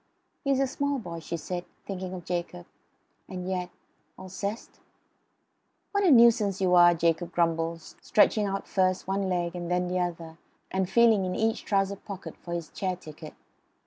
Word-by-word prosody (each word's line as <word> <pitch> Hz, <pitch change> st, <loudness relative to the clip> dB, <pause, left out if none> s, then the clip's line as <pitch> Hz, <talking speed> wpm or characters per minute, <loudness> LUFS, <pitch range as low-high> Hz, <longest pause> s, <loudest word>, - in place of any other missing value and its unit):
"HE'S 275 Hz, -1 st, +2 dB
a 275 Hz, -, +3 dB
small 280 Hz, +1 st, -1 dB
boy," 170 Hz, -9 st, -6 dB
she 170 Hz, +1 st, -5 dB
said, 175 Hz, +2 st, -4 dB, 0.2 s
thinking 185 Hz, -2 st, -5 dB
of 175 Hz, -2 st, -9 dB
Jacob. 170 Hz, -, -4 dB, 0.6 s
And 180 Hz, -1 st, -5 dB
yet 180 Hz, -1 st, -2 dB, 0.5 s
Alceste? 200 Hz, +4 st, -6 dB, 1.1 s
"What 405 Hz, 0 st, +1 dB
a 375 Hz, -, +5 dB
nuisance 230 Hz, -6 st, +5 dB
you 185 Hz, -2 st, +2 dB
are!" 175 Hz, -1 st, +7 dB
Jacob 165 Hz, +1 st, 0 dB
grumbled, 165 Hz, -1 st, 0 dB
stretching 210 Hz, +5 st, +2 dB
out 195 Hz, 0 st, -3 dB
first 185 Hz, -1 st, +1 dB
one 195 Hz, 0 st, -1 dB
leg 175 Hz, -1 st, -1 dB
and 175 Hz, -1 st, -5 dB
then 180 Hz, 0 st, 0 dB
the 180 Hz, 0 st, 0 dB
other 170 Hz, -2 st, -4 dB, 0.3 s
and 190 Hz, -1 st, 0 dB
feeling 225 Hz, -1 st, +5 dB
in 185 Hz, 0 st, -2 dB
each 220 Hz, 0 st, 0 dB
trouser 195 Hz, -1 st, +1 dB
pocket 195 Hz, -1 st, -8 dB
for 170 Hz, -, -11 dB
his 170 Hz, -2 st, -5 dB
chair 185 Hz, -2 st, -2 dB
ticket. 155 Hz, -2 st, -11 dB
185 Hz, 165 wpm, -27 LUFS, 175-200 Hz, 1.1 s, are